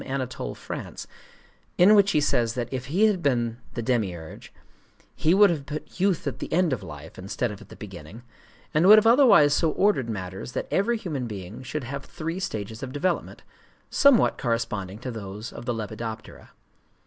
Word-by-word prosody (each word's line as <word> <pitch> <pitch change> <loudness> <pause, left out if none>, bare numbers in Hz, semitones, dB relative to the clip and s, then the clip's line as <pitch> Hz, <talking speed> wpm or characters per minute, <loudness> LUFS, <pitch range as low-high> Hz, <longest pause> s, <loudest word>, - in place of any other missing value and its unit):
Anatole 130 -2 -4
France, - - -7 0.7
in 185 +4 +7
which 200 -2 +5
he 155 - +3
says 120 -5 +1
that 120 0 -4
if 130 -1 -4
he 185 +10 +3
had 205 -5 +2
been 120 -6 0 0.2
the 120 - -3
Demiurge, 95 -10 -3 0.6
he 160 +4 +3
would 205 -1 +6
have 145 -4 -4
put 155 +4 -7
youth 190 -3 +1
at 130 -3 -3
the - - -6
end 170 -3 +2
of 125 - -3
life - - -10
instead 100 +5 -2
of 100 - -10
at - - -15
the - - -11
beginning, 95 +2 -10 0.5
and 155 +4 +4
would 215 +2 +10
have 215 - +4
otherwise 230 - +6
so 160 +2 +2
ordered 190 - +2
matters 95 +2 -6
that - - -3
every 230 +5 +1
human 150 - -4
being 100 +1 -7
should 130 +3 -5
have 140 +3 -5
three 165 +5 -5
stages 110 - -5
of 130 - -5
development, 170 +6 -2 0.5
somewhat 280 -5 +4
corresponding 115 -5 -2
to 125 +3 -6
those 105 0 -7
of - - -9
the 120 - -1
lepidoptera. 110 0 -7
130 Hz, 185 wpm, -25 LUFS, 110-170 Hz, 0.7 s, would